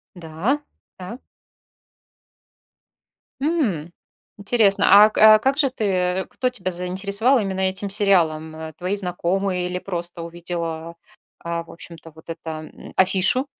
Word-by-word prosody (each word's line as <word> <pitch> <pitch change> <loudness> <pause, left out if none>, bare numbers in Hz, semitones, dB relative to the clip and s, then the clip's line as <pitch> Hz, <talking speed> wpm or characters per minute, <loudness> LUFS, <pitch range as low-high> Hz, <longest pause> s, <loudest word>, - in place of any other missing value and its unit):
Да, 175 - -2 0.4
так. 190 +7 -9 2.2
М, 240 - -1 0.5
интересно. 200 -1 +2 0.2
А 215 - +4
а, 215 0 +8
как 270 +5 0
же 280 -3 +3
ты 190 -5 -1
кто 255 - -1
тебя 195 -8 -4
заинтересовал 200 +8 0
именно 195 -3 -2
этим 190 +1 -1
сериалом? 170 -6 +1
Э, 160 0 -7
твои 185 +3 -2
знакомые 180 0 -2
или 180 0 -3
просто 175 -2 -3
увидела, 170 -1 -5 0.4
а, 170 0 -4
в - - -17
общем-то, 165 -1 -12
вот 160 +1 -17
это, 160 -1 -7
м, - - -13
афишу? 190 +8 +2
185 Hz, 125 wpm, -22 LUFS, 170-205 Hz, 2.2 s, а